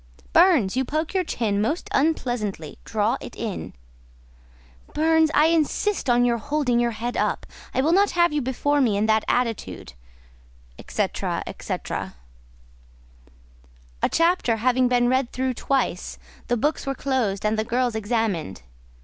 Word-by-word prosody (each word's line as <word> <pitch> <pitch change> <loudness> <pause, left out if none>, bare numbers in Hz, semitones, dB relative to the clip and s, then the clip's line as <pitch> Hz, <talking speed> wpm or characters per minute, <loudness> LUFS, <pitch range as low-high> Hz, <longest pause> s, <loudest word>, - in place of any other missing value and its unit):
"Burns, 310 - +5
you 260 - +1
poke 310 +6 -2
your 375 -1 +1
chin 210 - -1
most 300 +11 -1
unpleasantly; 240 - -1
draw 215 +1 0
it - - -9
in." 220 -5 -5 1.2
"Burns, 320 +1 +3
I 300 - +5
insist 330 +2 0
on 245 0 +4
your 235 -1 +1
holding 255 -1 0
your 240 0 +2
head 240 +2 -3
up; - - -1 0.3
I - - +1
will 305 +4 +2
not 395 +3 +4
have 345 -2 +4
you 300 - 0
before 285 +3 0
me 220 -6 +2
in 210 - +1
that 220 0 +2
attitude," 235 -3 -2 0.9
&c. - - -1
&c. - - -4 0.2
A - - -5 1.9
chapter 330 -8 +2
having 250 +3 +2
been 245 -1 +2
read 260 0 +1
through 260 0 -1
twice, 270 +3 -1 0.3
the 240 - +1
books 295 +4 -1
were 275 - -1
closed 235 -8 -1
and 210 +1 +2
the - - +1
girls 245 +1 0
examined. 205 - -2
245 Hz, 145 wpm, -24 LUFS, 220-295 Hz, 1.9 s, Burns